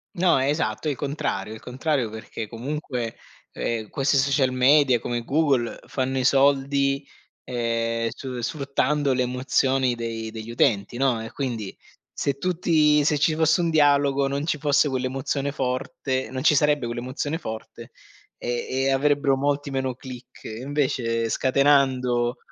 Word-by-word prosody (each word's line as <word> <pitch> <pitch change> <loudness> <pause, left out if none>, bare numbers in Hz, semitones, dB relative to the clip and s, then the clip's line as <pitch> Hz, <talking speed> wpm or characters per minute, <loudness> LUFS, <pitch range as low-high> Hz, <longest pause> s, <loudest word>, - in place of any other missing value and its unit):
No, 170 -5 +3
esatto, 140 -1 0
il 140 - -1
contrario 115 -8 -3
il 110 - -9
contrario 125 +1 -1
perché 110 0 -7
comunque, 125 -1 -4 0.4
ehm, 110 -3 -3
questi 135 0 +1
social 135 -1 +2
media 130 -1 +4
come 120 0 -3
Google 135 -4 +1
fanno 130 0 -2
i 130 - 0
soldi, 140 +1 +2 0.4
ehm, 115 -1 -1
su 125 -1 -6
sfruttando 140 +1 0
le 130 - 0
emozioni 130 0 +1
dei 115 -1 -5
degli 110 0 -8
utenti, 115 -1 +1
no. 125 -4 +1
E 115 - -8
quindi 115 -8 -4 0.3
se 140 -1 -2
tutti 155 -4 +3
se 150 -2 +2
ci 155 +1 +2
fosse 160 +2 +3
un 170 - +1
dialogo 140 -2 +3
non 140 +3 -2
ci 150 - 0
fosse 145 0 +2
quell'emozione 135 +2 -2
forte 130 0 -2
non 130 0 -3
ci 155 - +5
sarebbe 145 -3 +2
quell'emozione 130 +6 -3
forte 110 -8 -8 0.5
e 120 0 -2
e 135 +1 0
avrebbero 140 0 +2
molti 145 +1 -1
meno 130 -1 -2
click. 130 -1 -11
Invece 115 -2 -1
scatenando, 130 -3 +2
135 Hz, 140 wpm, -24 LUFS, 120-145 Hz, 0.5 s, ci